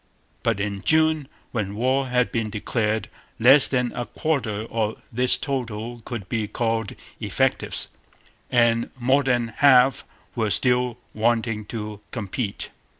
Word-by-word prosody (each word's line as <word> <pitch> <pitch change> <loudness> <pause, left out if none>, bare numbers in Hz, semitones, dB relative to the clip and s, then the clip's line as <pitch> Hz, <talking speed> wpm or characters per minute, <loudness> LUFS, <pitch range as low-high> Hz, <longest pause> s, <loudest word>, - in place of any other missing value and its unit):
But 115 -3 0
in 100 -1 -2
June, 155 0 +3 0.2
when 100 -4 -2
war 130 +4 +1
had 125 -1 +1
been 115 -2 -1
declared, 110 +1 -1 0.3
less 130 +5 +7
than 125 -2 0
a 120 - -4
quarter 115 -9 -1
of 110 -1 -1
this 125 +2 +2
total 120 -3 -4
could 110 -6 -6
be 110 -1 -1
called 115 -1 -2 0.2
effectives, - - 0 0.6
and 115 -1 +3
more 130 +3 +3
than 120 -4 +1
half 135 -2 +5 0.3
were 110 -3 0
still 125 +1 +2 0.2
wanting 115 -1 0
to 105 -1 -6
complete.' 105 -1 -4
120 Hz, 130 wpm, -24 LUFS, 110-125 Hz, 0.6 s, less